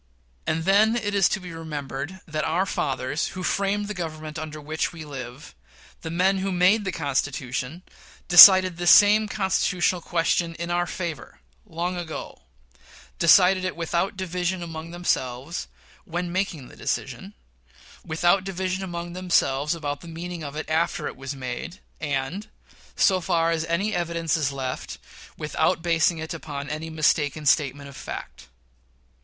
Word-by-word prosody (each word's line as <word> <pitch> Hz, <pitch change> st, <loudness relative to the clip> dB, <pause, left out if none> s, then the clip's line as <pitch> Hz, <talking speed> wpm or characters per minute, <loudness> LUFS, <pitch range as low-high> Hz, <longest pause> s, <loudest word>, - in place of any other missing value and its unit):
And 160 Hz, +1 st, -1 dB
then 210 Hz, +4 st, +4 dB
it 205 Hz, -3 st, -2 dB
is 195 Hz, -3 st, +4 dB
to 210 Hz, -, -1 dB
be 180 Hz, -2 st, -9 dB
remembered 150 Hz, +1 st, -6 dB
that 155 Hz, -2 st, -3 dB
"our 180 Hz, +4 st, +1 dB
fathers; 135 Hz, -4 st, -2 dB
who 185 Hz, -, -4 dB
framed 200 Hz, +2 st, 0 dB
the 210 Hz, -, -4 dB
Government 155 Hz, -3 st, -6 dB
under 155 Hz, -1 st, -6 dB
which 155 Hz, +2 st, -2 dB
we 165 Hz, -3 st, -9 dB
live", 130 Hz, -2 st, -8 dB, 0.5 s
the 160 Hz, -, -5 dB
men 185 Hz, +4 st, +2 dB
who 195 Hz, +1 st, -2 dB
made 190 Hz, +4 st, +3 dB
the 190 Hz, -, -1 dB
Constitution 140 Hz, 0 st, -3 dB, 0.4 s
decided 185 Hz, 0 st, +10 dB
this 175 Hz, -1 st, +2 dB
same 210 Hz, +3 st, +7 dB
constitutional 185 Hz, -3 st, 0 dB
question 165 Hz, 0 st, 0 dB
in 170 Hz, +1 st, -4 dB
our 175 Hz, 0 st, +1 dB
favor, 165 Hz, -, -6 dB, 0.3 s
long 175 Hz, +2 st, -3 dB
ago; 165 Hz, -3 st, -7 dB, 0.8 s
decided 185 Hz, +2 st, +6 dB
it 185 Hz, -, -2 dB
without 170 Hz, +3 st, -1 dB
division 180 Hz, -1 st, -2 dB
among 165 Hz, -1 st, -7 dB
themselves, 160 Hz, -3 st, -2 dB, 0.4 s
when 175 Hz, -1 st, -3 dB
making 180 Hz, -8 st, -2 dB
the -, -, -15 dB
decision, -, -, -4 dB, 0.7 s
without 175 Hz, +4 st, +2 dB
division 190 Hz, 0 st, -3 dB
among 175 Hz, -1 st, -5 dB
themselves 170 Hz, -4 st, +1 dB
about 145 Hz, -3 st, -4 dB
the 170 Hz, -, -11 dB
meaning 170 Hz, +1 st, -6 dB
of 145 Hz, 0 st, -7 dB
it 155 Hz, -, -5 dB
after 160 Hz, +2 st, 0 dB
it -, -, -4 dB
was 135 Hz, +2 st, -6 dB
made, 135 Hz, +8 st, -6 dB, 0.2 s
and, 145 Hz, +7 st, -3 dB, 0.5 s
so 185 Hz, -1 st, +3 dB
far 165 Hz, -1 st, +1 dB
as 165 Hz, -1 st, -1 dB
any 180 Hz, +6 st, -1 dB
evidence 170 Hz, -2 st, -1 dB
is 150 Hz, -4 st, 0 dB
left, 130 Hz, -2 st, -5 dB, 0.4 s
without 160 Hz, +3 st, 0 dB
basing 165 Hz, 0 st, +2 dB
it 160 Hz, +1 st, -5 dB
upon 145 Hz, -3 st, -6 dB
any 155 Hz, +2 st, -4 dB
mistaken 155 Hz, -1 st, +1 dB
statement 140 Hz, -1 st, +2 dB
of 140 Hz, -, -12 dB
facts. -, -, -8 dB
170 Hz, 150 wpm, -24 LUFS, 150-185 Hz, 0.8 s, decided